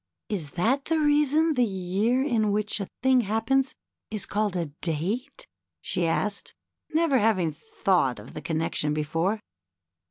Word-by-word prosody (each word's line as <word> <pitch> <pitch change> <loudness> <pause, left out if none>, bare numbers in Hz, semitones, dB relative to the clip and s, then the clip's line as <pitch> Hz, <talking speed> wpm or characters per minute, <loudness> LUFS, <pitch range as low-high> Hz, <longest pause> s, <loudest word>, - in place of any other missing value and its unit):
^^Is 165 -9 -3
that 250 +11 +1
the 325 0 +1
reason 300 +2 +3
the 250 -3 +3
year 200 +5 +1
in 225 -7 +1
which 210 +1 0
a 200 - -3 0.2
thing 260 -1 +5
happens 235 +6 +1 0.3
is 215 -2 -2
called 210 -2 -1
a 175 -2 0 0.2
date? 210 - -2 0.3
she 175 -3 -1
asked, 200 +5 -1 0.4
never 315 -4 +3
having 190 -7 +2
thought 175 - 0
of 105 +3 -11
the 155 - -6
connection 155 -1 0
be 155 - 0
fore. 170 +8 0
210 Hz, 150 wpm, -26 LUFS, 175-260 Hz, 0.4 s, thing